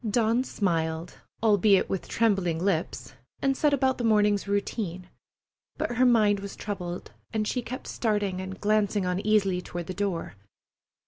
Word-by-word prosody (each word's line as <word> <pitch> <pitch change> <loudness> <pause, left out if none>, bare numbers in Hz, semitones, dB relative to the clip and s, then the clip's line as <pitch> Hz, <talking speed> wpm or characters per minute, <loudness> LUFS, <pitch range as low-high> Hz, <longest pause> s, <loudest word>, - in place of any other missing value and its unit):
Dawn 230 +3 +2
smiled, 165 -6 -2 0.2
albeit 205 -2 +4
with 190 - -3
trembling 195 -7 +1
lips, 175 -1 -2 0.3
and 270 0 +1
set 295 +2 +2
about 265 -2 +1
the - - -2
morning's 210 -3 +3
routine; 200 -3 -2 0.7
but 240 - -2
her 255 0 +5
mind 210 -4 +4
was 200 0 -7
troubled, 180 -4 -5 0.2
and 215 -1 -1
she 250 - -1
kept 255 +2 -7
starting 205 -5 -1
and 190 0 -7
glancing 210 -2 +1
uneasily 195 0 +1
toward 175 -1 -6
the 185 - -5
door. 190 -3 -2
205 Hz, 145 wpm, -27 LUFS, 185-220 Hz, 0.7 s, her